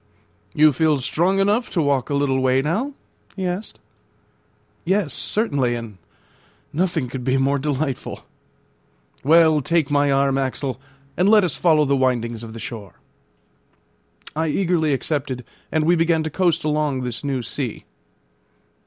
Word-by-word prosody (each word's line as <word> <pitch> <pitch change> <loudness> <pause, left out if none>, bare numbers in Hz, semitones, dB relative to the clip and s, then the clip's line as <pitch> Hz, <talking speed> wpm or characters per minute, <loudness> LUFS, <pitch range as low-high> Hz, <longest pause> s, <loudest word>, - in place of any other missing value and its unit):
"You 155 0 +5
feel 155 +2 +2
strong 175 +8 0
enough 205 +5 +1
to 175 - -2
walk 140 -4 +1
a 145 - 0
little 140 -2 +1
way 130 0 +2
now?" 215 - -1 0.4
he 190 - -3
asked. 180 +4 -4 1.0
"Yes, 190 -3 0
certainly; 140 - 0
and 115 -5 -8 0.7
nothing 170 -4 0
could 125 0 -6
be 130 +1 +1
more 140 +1 +1
delightful." 140 -1 -3 1.0
"Well, 160 +1 +5
take 160 -1 0
my 145 -1 +3
arm, 135 0 +2
Axel, 130 0 -3 0.3
and 185 +3 +3
let 215 -1 +6
us 180 - 0
follow 155 -3 +3
the 140 0 +2
windings 120 -3 0
of 115 -1 -9
the 115 - -8
shore." 105 -7 -7 1.4
I 160 +1 0
eagerly 165 -1 +1
accepted, 135 -2 -2 0.3
and 155 -1 +1
we 170 +3 +4
began 165 -1 +2
to 160 - -4
coast 170 -1 +1
along 150 -3 0
this 125 0 -5
new 135 -3 -2
sea. 120 0 -5
145 Hz, 145 wpm, -21 LUFS, 130-165 Hz, 1.4 s, let